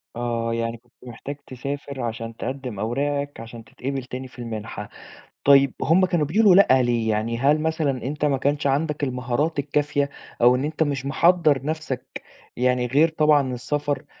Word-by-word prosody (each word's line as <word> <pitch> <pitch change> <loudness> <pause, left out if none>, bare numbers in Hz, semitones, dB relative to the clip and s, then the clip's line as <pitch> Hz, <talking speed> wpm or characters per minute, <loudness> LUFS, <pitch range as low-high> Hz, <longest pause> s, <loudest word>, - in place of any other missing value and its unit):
آه، 115 -1 -2
يعني 115 0 -2
كنت 120 +1 -33
محتاج 125 +4 -7
تسافر 140 +1 -6
عشان 115 -1 -4
تقدم 130 -5 -5
أوراقك، 140 +5 -2
عشان 115 0 -9
تتقبل 135 +4 -5
تاني 130 +1 -7
في 125 - -17
المنحة، 110 -3 -6 0.6
طيب 140 -1 +6
هُم 180 +5 +4
كانوا 170 -4 +1
بيقولوا 195 +4 +5
لأ 130 -10 +6
ليه؟ 120 -2 0
يعني 110 +2 -1
هل 145 +4 +3
مثلًا 160 -3 0
أنت 145 +3 -2
ما 140 -2 +2
كانش 145 +2 0
عندك 145 +2 0
المهارات 130 +4 -1
الكافية، 145 0 0 0.3
أو 125 +1 +6
إن 130 - -1
أنت 155 +1 0
مش 140 -2 -2
محضّر 155 -2 +3
نفسك 155 -4 -4 0.4
يعني 125 0 +2
غير 150 +6 +4
طبعًا 150 -4 +2
السفر 145 +4 -2
135 Hz, 160 wpm, -23 LUFS, 120-150 Hz, 0.6 s, طيب